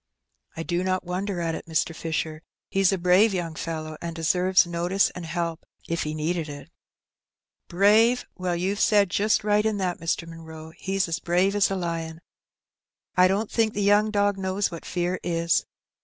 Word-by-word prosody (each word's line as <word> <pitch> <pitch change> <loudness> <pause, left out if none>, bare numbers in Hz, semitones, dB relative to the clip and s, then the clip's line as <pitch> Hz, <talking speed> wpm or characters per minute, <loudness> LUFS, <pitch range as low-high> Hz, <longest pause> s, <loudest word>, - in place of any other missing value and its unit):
"I 165 - -3
do 175 +1 -1
not 185 0 0
wonder 180 +1 -3
at 165 -1 -1
it, - - -7
Mr. 160 0 0
Fisher; 160 -1 -3 0.3
he's 195 -1 +3
a 195 - 0
brave 185 +4 +4
young 170 -3 -3
fellow, 155 -1 -5
and 170 -1 -5
deserves 180 +3 +3
notice 175 +3 +1
and 180 -2 -8
help 170 0 -3
— - - -24
^if 170 - 0
he 150 0 -3
needed 160 +1 -2
it." 145 0 -9 0.5
" - - -64
Brave! 215 +7 +4
Well, 180 -2 -2
youVe 190 +4 -1
said 205 -4 +4
just 215 +1 +2
right 210 0 +3
in 220 -1 0
that, 185 -3 -2
Mr. 165 0 -2
Munroe; 160 -1 -10
he's 195 +1 -1
as 165 - -2
brave 180 +3 +1
as 205 - +3
a 195 - -1
lion. 165 -3 -4 1.0
I 185 0 +6
don't 200 +3 -1
think 225 -2 +1
the 205 - 0
young 205 +2 +4
dog 205 -1 +1
knows 190 +1 -1
what 165 - -8
fear 180 +1 -2
is. 170 -1 0
180 Hz, 185 wpm, -25 LUFS, 165-195 Hz, 1.0 s, I